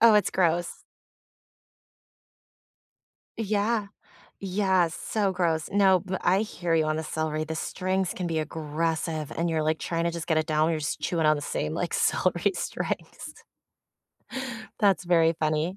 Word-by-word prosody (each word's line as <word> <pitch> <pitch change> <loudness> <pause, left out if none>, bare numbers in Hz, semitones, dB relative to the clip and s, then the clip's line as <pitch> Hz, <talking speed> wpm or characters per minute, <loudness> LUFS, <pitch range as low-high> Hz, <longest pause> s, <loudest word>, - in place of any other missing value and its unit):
oh, 230 -2 +7
it's 210 - +3
gross. 175 -1 0 2.5
Yeah. 215 0 0 0.5
Yeah, 190 -2 +2
so 195 +3 -1
gross. 165 -3 0
No, 195 -2 +5
but 190 +2 -4
I 190 +3 +3
hear 175 -6 -1
you 160 -1 +3
on 155 0 0
the 160 - -2
celery, 155 0 -2
the 160 0 -4
strings 185 +3 -1
can 180 - -4
be 160 -2 0
aggressive, 160 0 -2
and 170 +1 0
you're, 160 -1 0
like, 155 +1 +1
trying 170 0 -2
to 170 - +1
just 170 -1 -5
get 160 - +1
it 155 -1 +1
down, 155 +1 +2
you're 155 -2 -1
just 145 - -3
chewing 165 -3 0
on 155 0 +5
the 145 - -4
same, 75 - -2
like, - - -2
celery - - +2
strings. - - -5 1.4
That's 195 -3 +3
very 165 -2 +4
funny. 155 +4 0
165 Hz, 155 wpm, -27 LUFS, 155-190 Hz, 2.5 s, oh